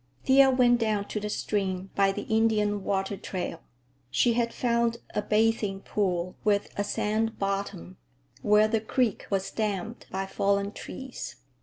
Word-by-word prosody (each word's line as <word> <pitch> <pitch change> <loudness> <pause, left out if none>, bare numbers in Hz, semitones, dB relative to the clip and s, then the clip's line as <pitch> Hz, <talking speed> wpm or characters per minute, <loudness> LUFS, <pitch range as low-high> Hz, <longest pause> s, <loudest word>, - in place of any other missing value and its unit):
Thea 270 0 +7
went 245 -2 +4
down 215 -3 0
to 210 - -2
the 210 0 -4
stream 190 -3 -2
by 195 -1 +3
the - - -4
Indian 215 -2 +1
water 195 +1 -1
trail. 180 -3 -5 0.5
She 230 - +3
had 235 0 +1
found 235 -1 +1 0.2
a 210 - 0
bathing 215 -2 +1
pool 180 -4 -1
with 205 -1 +1
a 205 - 0
sand 220 +2 -1
bottom, 195 - -3 0.4
where 210 +1 +5
the 220 0 0
creek 235 0 0
was 195 -1 -1
damned 215 +1 -3
by 195 +1 -2
fallen 200 +1 0
trees. 260 - -7
210 Hz, 150 wpm, -28 LUFS, 195-225 Hz, 0.5 s, Thea